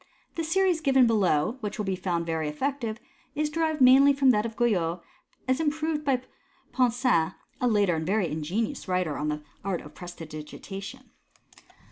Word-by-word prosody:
The 330 - -3
series 355 0 +2
given 265 -3 +5
below, 210 - +2
which 210 -2 -5
will 210 - -2
be 190 -1 -1
found 175 -2 -2
very 160 -2 -1
effective, 235 - -2 0.4
is 300 0 -1
derived 315 -2 -1
mainly 270 +2 +7
from 275 -2 +4
that 210 -1 +1
of 225 - -10
Guyot, 180 -8 +1 0.5
as 260 +2 +2
improved 310 0 -1
by 265 -4 +1 0.5
Ponsin, 245 - +2 0.3
a 250 - +3
later 205 -5 +3
and 160 0 -3
very 200 -1 +1
ingenious 180 - -3
writer 180 -5 0
on 150 - -2
the 150 0 -3 0.2
art 190 -3 -2
of 150 - -13
presti 175 -2 -9
digitation. 195 - -9
220 Hz, 165 wpm, -27 LUFS, 175-270 Hz, 0.5 s, mainly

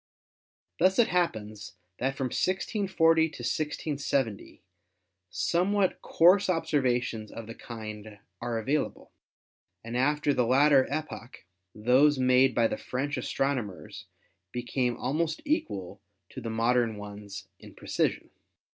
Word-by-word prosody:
Thus 190 +2 +4
it 235 -1 +4
happens 110 - -2 0.3
that 135 +2 -1
from 130 -2 -2
1640 185 -4 +2
to 160 - +4 0.2
1670 140 -5 -2 0.7
some 170 - 0
what 200 -3 +1
coarse 185 +4 +4
observations 125 - 0
of 115 - -8
the 115 - -8
kind 110 -3 -8 0.2
are 120 -1 -2
available, 135 +7 -2 0.7
and 115 +1 -6
after 145 +3 +2
the 125 -3 +1
latter 135 +1 +5
epoch 145 -7 -6 0.3
those 130 +7 +4
made 130 0 +4
by 115 - +3
the - - -3
French 140 +3 -3
astrono 135 -3 -1
mers 100 -3 -10 0.5
become 120 0 -1
almost 155 +6 -1
equal 100 - -2 0.3
to 130 - -8
the 115 - -4
modern 115 0 +1
ones 100 -1 -9
in - - -14
precision. - - -2
130 Hz, 120 wpm, -28 LUFS, 115-155 Hz, 0.7 s, latter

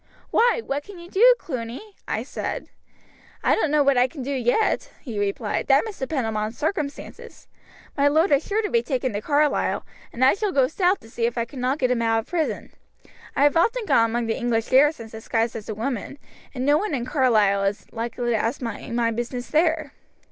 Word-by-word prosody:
'Why, 475 0 +3
what 280 +1 -2
can 400 +1 -12
you 345 +1 -12
do, 485 +5 +6
Cluny?' 255 - -6
I - - -2
said. - - -5 0.7
'I - - +4
don't 320 - +1
know 300 0 +3
what 275 -2 +3
I 250 - +4
can 265 0 -8
do 275 - -4
yet,' 265 - +1
he 230 -7 -6
replied; 205 +1 -2
'that 275 +5 +4
must 435 -3 -8
depend 265 -2 -2
upon 215 0 -2
circumstances. 300 - -5 0.5
My 285 0 +3
lord 315 +5 +3
is 285 +1 +4
sure 430 +2 -1
to 415 - -2
be 470 - +3
taken 260 - -2
to 205 - -2
Carlisle, 295 +4 +1 0.3
and 255 +2 +2
I 265 - +6
shall 410 0 -1
go 270 -6 +3
south 360 +6 +1
to 225 - -15
see 230 -1 0
if 240 - -5
I 230 - 0
cannot 255 +2 -2
get 255 -4 +1
him 240 -2 +1
out 225 -1 +2
of - - -18
prison. 330 -3 -2 0.6
I 275 - +3
have 290 +2 +4
often 455 +8 +2
gone 230 - +3
among 235 +1 -1
the 225 - -1
English 235 -3 -1
garrisons 265 -4 +3
disguised 225 +1 -2
as 220 -1 -7
a 215 - -3
woman, 245 +3 -4 0.4
and 255 0 -2
no 290 +2 +4
one 415 -7 -2
in 240 -2 -3
Carlisle 215 -8 +3
is 200 +1 -2
likely 240 +1 -3
to - - +2
ask 230 +4 -1
me 230 -4 -6
my 235 -1 +1
business 240 +2 -4
there.' 315 -2 +1
260 Hz, 215 wpm, -24 LUFS, 230-315 Hz, 0.7 s, do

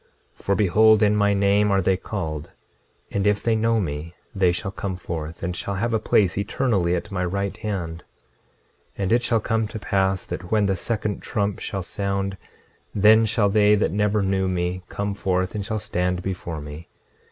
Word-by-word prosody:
26:24 - - -18
For 100 - +1
behold, 110 +2 +5
in 105 0 +4
my 100 -1 +3
name 100 +1 +3
are 100 -1 +3
they 95 0 +2
called; 80 -6 -5 0.6
and 100 0 0
if 105 0 +1
they 115 -1 +2
know 115 +1 +2
me 80 -1 -4 0.2
they 95 -3 +3
shall 90 +2 -3
come 95 -1 -4
forth, 85 -2 -6
and 90 0 -2
shall 100 +3 -3
have 115 +4 -1
a 110 - +2
place 100 -3 +2
eternally 100 -5 +1
at 90 - -5
my 90 -2 -1
right 100 +2 -2
hand. 85 -6 -4 0.9
26:25 100 - -2
And 95 - -1
it 120 - +4
shall 115 -2 +1
come 110 0 0
to 105 - -7
pass 95 -2 0
that 90 0 -6
when 105 -2 +3
the 95 -1 +1
second 105 0 -2
trump 100 -2 -2
shall 95 -1 -4
sound 100 +1 -2 0.6
then 110 +2 +6
shall 105 -2 +2
they 105 0 +5
that 105 - +1
never 105 +1 +1
knew 95 0 +1
me 90 0 -1
come 100 0 -2
forth 95 -2 -1
and 105 - -3
shall 110 +2 -2
stand 90 -3 -1
before 90 -4 -4
me. 75 +3 -9
100 Hz, 195 wpm, -23 LUFS, 90-105 Hz, 0.9 s, then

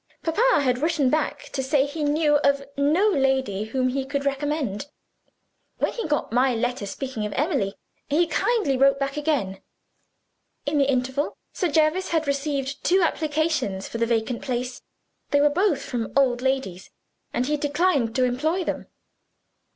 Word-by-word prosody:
Papa 415 +3 +3
had 250 -2 +1
written 305 -3 +1
back 300 -1 -1
to 270 - -1
say 270 +1 +2
he 295 +2 -5
knew 295 0 +3
of 280 -1 +2
no 305 +9 +3
lady 265 - +1
whom 255 +3 0
he 270 +1 -1
could 280 +1 -3
recommend. 280 -4 -2 0.9
When - - 0
he 465 - -3
got 295 -6 -1
my 250 +1 +3
letter 245 -2 -2
speaking 255 +1 -4
of 210 - -7
Emily, 270 - 0 0.3
he 315 +5 +3
kindly 340 - +1
wrote 275 +1 +4 0.2
again. 285 -11 -1 1.0
In 290 0 +1
the 280 0 +3
interval, 265 +2 -1 0.2
Sir 365 - 0
Jervis 315 +4 +2
had 320 -2 +1
received 280 -1 -2
two 370 +1 +3
applications 310 - 0
for 230 - -5
the 230 - +1
vacant 235 +1 -1
place. 250 -1 -3 0.5
They 285 - +3
were 295 +1 +5
both 360 -2 +1
from 235 -3 -3
old 250 -3 +3
ladies 265 -9 -2 0.4
and 245 - 0
he 300 +3 +1
declined 290 -4 +1
to 255 - +3
employ 305 +9 0
them." - - -4
280 Hz, 160 wpm, -24 LUFS, 250-310 Hz, 1.0 s, were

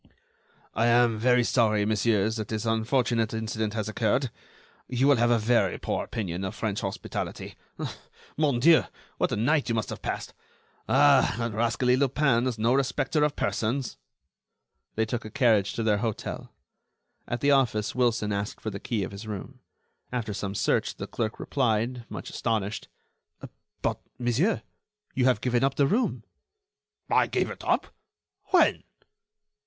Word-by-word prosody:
"I 115 +3 +2
am 120 -2 +4
very 125 +1 +4
sorry, 110 -4 +2
messieurs, 110 0 +1
that 110 -2 -4
this 110 0 -3
unfortunate 115 0 +1
incident 110 -1 -2
has 110 -2 -2
occurred. 115 +4 0 0.6
You 125 +1 +1
will 145 -2 +5
have 120 +1 +3
a 120 - +4
very 115 +2 +2
poor - - -2
opinion 95 -4 -4
of 95 +2 -4
French 110 -2 -2
hospitality. 95 -3 -5 0.8
Mon 145 -5 +1
Dieu! 165 +5 +6 0.3
what - - +1
a - - +1
night 135 +6 +1
you 115 - +1
must 110 -3 -2
have - - -7
passed! - - -4 0.6
Ah! 135 -2 +5
that 115 -2 -2
rascally 120 +3 +2
Lupin 130 -2 +2
is 120 -3 -2
no 115 +3 +2
respecter 140 +3 +1
of 150 -1 +1
persons." 120 +4 -1 1.0
They 110 - +1
took 115 +1 -3
a 110 - -7
carriage 110 -7 +2
to 115 - -2
their 105 -2 +3
hotel. 110 -1 -4 0.8
At 120 0 -3
the 145 - +4
office 120 -6 +2
Wilson 115 -4 +1
asked 100 +1 -3
for 110 - -4
the 100 - -6
key 110 -2 -2
of 95 - -5
his 100 +2 -8
room. 105 -3 -7 0.5
After 120 -4 -2
some 100 0 -4
search - - +1
the - - -5
clerk 110 -1 -3
replied, 120 -2 0
much - - -7
astonished: 110 -2 -2 1.0
"But, - - 0 0.2
monsieur, 125 - +1 0.5
you 130 - +1
have 130 -1 +3
given 125 0 +1
up 135 - +1
the 140 - +3
room." 230 - 0 0.8
"I - - +3
gave - - -1
it - - -9
up? - - +1 0.6
When?" - - +3
115 Hz, 160 wpm, -27 LUFS, 110-125 Hz, 1.0 s, Dieu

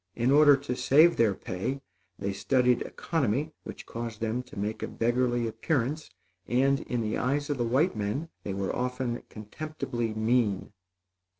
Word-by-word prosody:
In 120 +2 +2
order 145 -1 +7
to 125 -2 -4
save 155 +7 +5
their 110 -4 +3
pay, 95 +12 -3 0.4
they 100 0 -2
studied 125 +3 +2
economy, 145 -1 -1
which - - -9
caused 115 -2 -6
them 115 +2 -1
to 125 -3 -14
make 105 +2 -3
a - - -2
beggarly 120 0 +1
appearance, 135 +6 -1 0.4
and, 135 +3 +3
in 120 -1 -3
the 110 -1 -1
eyes 145 +3 0
of 140 - -2
the - - +2
white 135 +7 +2
men, 110 +10 -2
they 95 - -4
were 95 -1 -2
often 125 -1 -2
contemptibly 120 0 -4
mean. 110 -3 +1
125 Hz, 160 wpm, -28 LUFS, 110-140 Hz, 0.4 s, order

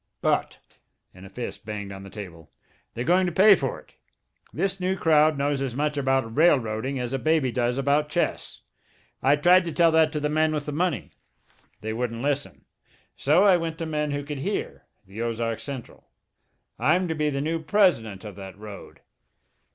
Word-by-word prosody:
But" - - 0 0.6
and 95 +1 -12
a - - -14
fist 120 +4 -7
banged 105 -2 -6
on 95 0 -8
the 100 - -10
table 90 -7 -10 0.5
"they're 120 - -2
going 180 +5 +3
to - - -1
pay 200 +5 +7
for 135 -8 -1
it! - - -22 0.5
This 195 0 -1
new 185 +1 0
crowd 155 -3 +3
knows 140 0 0
as 130 -3 -3
much 150 +2 -1
about 135 -4 0
railroading 135 -5 +2
as 125 0 -3
a 135 - -1
baby 155 -3 +1
does 120 +1 0
about 145 +2 +1
chess. 175 +3 -2 0.6
I 140 +2 +4
tried 180 +5 +5
to 170 - -3
tell 165 0 +4
that 160 -1 +4
to 150 - -1
the 150 - 0
men 155 +1 +1
with 145 -1 -3
the 150 - -4
money. 155 - -1 0.7
They 110 +1 -3
wouldn't 115 0 -3
listen. 145 0 -2 0.5
So 155 +7 +3
I 195 -3 +6
went 165 -1 -4
to 165 - -4
men 150 -1 -2
who 145 0 -3
could 145 -1 -6
hear, 200 +9 -4 0.2
the 100 +4 -8
Ozark 115 -1 -2
Central. 135 -4 -9 0.7
I'm 175 +5 +2
to 165 - -1
be 150 -1 0
the 140 -1 -2
new 160 +3 -2
president 150 - +1
of 105 -3 -8
that 95 -1 -9
road." 105 -2 -11
145 Hz, 190 wpm, -25 LUFS, 115-160 Hz, 0.7 s, pay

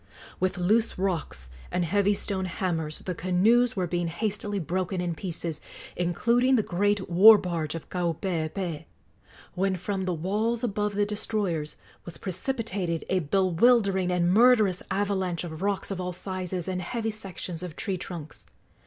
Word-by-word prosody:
With 185 -1 0
loose 215 +6 +2
rocks 165 - -3 0.2
and 180 -1 0
heavy 200 +4 +2
stone 190 -1 -2
hammers 170 -4 -2
the 185 - -2
canoes 205 +8 +3
were 185 -3 0
being 175 0 -1
hastily 205 +3 -2
broken 185 +1 -2
in 175 -1 -1
pieces, 165 -2 -4 0.3
including 235 +9 +2
the 220 - +2
great 205 +2 0
war 205 +6 +9
barge 165 -5 -3
of 165 - -7
Kaupeepee, 170 -1 -2 0.7
when 190 +1 0
from 190 +1 -3
the 180 - 0
walls 215 +8 -1
above 210 -2 -1
the 205 0 +2
destroyers 205 -7 -2 0.3
was 170 - -8
precipitated 190 -4 -2
a 190 - +2
bewildering 190 - +3
and 175 0 +2
murderous 215 -5 +5
avalanche 190 -3 -1
of 160 -1 -7
rocks 200 0 -1
of 185 -1 -3
all 180 0 -3
sizes 185 -1 -4
and 185 -1 -2
heavy 225 +4 -2
sections 190 -5 -7
of 180 -4 -6
tree 190 -4 -3
trunks. 160 -5 -8
185 Hz, 150 wpm, -27 LUFS, 175-205 Hz, 0.7 s, war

